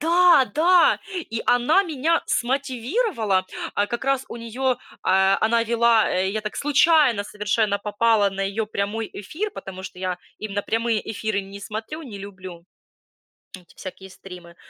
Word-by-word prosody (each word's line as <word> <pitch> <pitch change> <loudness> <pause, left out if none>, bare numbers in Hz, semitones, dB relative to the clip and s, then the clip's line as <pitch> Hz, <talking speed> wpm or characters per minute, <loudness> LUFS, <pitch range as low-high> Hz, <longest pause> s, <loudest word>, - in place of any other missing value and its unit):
Да, 340 -2 +5
да! 350 +3 +5 0.3
И 225 0 -3
она 250 +11 +4
меня 325 -1 0
смотивировала, 250 - 0 0.3
а, 205 - +1
как 240 +4 -4
раз 275 -1 +1
у - - -7
неё, 245 +3 -1 0.3
а, 190 +1 +3
она 230 +1 +3
вела, 230 -1 +3
э, 185 +1 0
я 215 +2 -2
так 215 - -5
случайно 290 -6 +3
совершенно 210 0 0
попала 210 0 +2
на 195 0 -4
её 200 +3 -2
прямой 210 +2 -3
эфир, 325 - -5
потому 190 - -9
что 185 -1 -9
я 185 -1 -3 0.2
именно 205 -1 -3
прямые 225 0 0
эфиры 215 -1 -2
не 195 +1 -10
смотрю, 225 +11 -6
не 220 -8 -9
люблю 185 -3 -10 0.9
эти 180 -2 -18
всякие 190 0 -9
стримы. 180 -2 -12
220 Hz, 150 wpm, -23 LUFS, 195-265 Hz, 0.9 s, Да